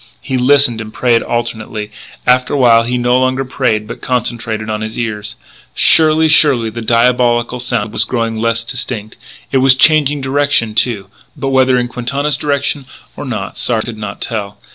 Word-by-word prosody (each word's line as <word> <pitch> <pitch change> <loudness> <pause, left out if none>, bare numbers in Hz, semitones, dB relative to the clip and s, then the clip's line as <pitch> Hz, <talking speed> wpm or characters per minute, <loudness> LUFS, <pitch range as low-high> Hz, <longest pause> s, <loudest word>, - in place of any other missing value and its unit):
He 130 - -3
listened 130 -2 +3
and 110 -1 -8
prayed 120 -1 +1
alternately. 110 -2 -4 0.3
After 125 +2 +2
a - - +1
while 120 -3 +5
he 125 +2 -2
no 125 +1 +2
longer 130 +1 0
prayed 120 -4 -1
but - - -8
concentrated 115 -3 -2
on 110 0 -3
his 110 0 -5
ears. 105 -2 -4 0.4
Surely, 160 0 +4
surely, 135 -7 +3
the 115 +2 -6
diabolical 120 +1 +1
sound 120 -4 -2
was - - +1
growing 115 -2 -2
less 115 +1 -1
distinct.... 115 -3 -5 0.4
It 135 - +2
was 130 0 +5
changing 150 0 +3
direction 135 -4 0
too. 110 -3 0 0.3
But 135 - -2
whether 130 -1 +3
in 120 0 0
Quintana's 140 +5 -2
direction 140 -1 -2 0.3
or 145 - -7
not 110 -7 -5
Sard 115 -3 0
could 115 -2 -7
not 105 -1 -7
tell. 105 -3 -4
120 Hz, 170 wpm, -14 LUFS, 110-130 Hz, 0.4 s, while